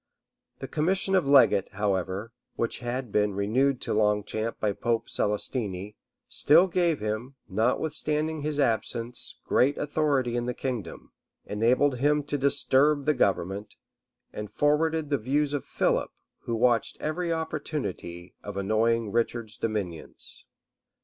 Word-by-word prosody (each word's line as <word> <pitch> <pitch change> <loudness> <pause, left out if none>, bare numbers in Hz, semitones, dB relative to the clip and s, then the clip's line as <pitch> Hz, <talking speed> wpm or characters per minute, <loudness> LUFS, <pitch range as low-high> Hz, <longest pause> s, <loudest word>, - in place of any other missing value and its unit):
The - - -6
commission 190 +5 +1
of 185 -6 +3
legate, 120 -8 +5
however, 100 +2 -2 0.2
which 115 - -2
had 120 -1 -4
been 105 -1 +1
renewed 125 +7 +1
to - - -2
Longchamp 105 +1 0
by 105 -2 0
Pope 115 +2 -1
Celestine, 105 -2 -2 0.3
still 165 +5 +5
gave 175 -3 +1
him, 110 +5 -4
notwithstanding 150 +8 -1
his 150 0 -2
absence, 115 -1 -1
great 140 +3 +2
authority 145 -5 0
in 120 0 -1
the 125 - -2
kingdom, 125 -7 -5 0.3
enabled 125 +5 +2
him 150 +2 +2
to 145 +1 -2
disturb 140 +1 +3
the 150 - +3
government, 100 - -1 0.6
and 105 -1 -6
forwarded 155 +1 +1
the 140 - +2
views 140 +5 0
of 145 - -2
Philip, - - 0 0.4
who 115 - -1
watched 120 -1 +2
every 170 +3 -2
opportunity 100 - -4
of 100 -1 -6
annoying 110 +2 +1
Richard's 115 -1 -1
dominions. 100 -8 -5
120 Hz, 130 wpm, -27 LUFS, 105-145 Hz, 0.6 s, legate